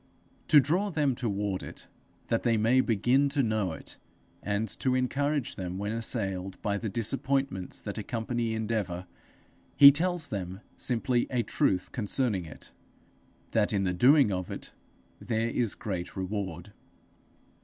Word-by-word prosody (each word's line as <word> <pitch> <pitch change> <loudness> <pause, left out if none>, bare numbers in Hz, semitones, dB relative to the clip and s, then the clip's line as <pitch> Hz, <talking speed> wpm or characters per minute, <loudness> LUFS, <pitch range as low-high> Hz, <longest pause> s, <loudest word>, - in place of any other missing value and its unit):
To 150 - +8
draw 175 +10 +1
them 150 -6 +1
toward 105 -5 -2
it - - -9 0.4
that 115 - +1
they 115 -2 +2
may 115 +4 +4
begin 125 +5 +2
to 140 -1 +1
know 110 -5 0
it, 80 - -8 0.4
and 100 +2 -1
to 130 -1 +1
encourage 140 +2 -1
them 90 -1 -4
when 100 +2 -3
assailed 95 -5 -2
by 100 -1 0
the 110 - -3
disappointments 130 -2 -1
that - - -5
accompany 115 0 -2
endeavour, 105 -5 -2 0.7
he 140 -1 +11
tells 170 +2 0
them 95 -1 -5
simply 120 0 0
a 125 -3 0
truth 90 -3 0
concerning 105 -4 0
it 75 - -12 0.8
that 110 +1 +2
in 100 -2 +1
the 90 -1 0
doing 130 - +5
of 90 -1 -3
it, - - -7 0.5
there 115 -1 -1
is 115 -3 0
great 90 -4 -5
reward. 95 -1 -4
110 Hz, 145 wpm, -29 LUFS, 100-130 Hz, 0.8 s, he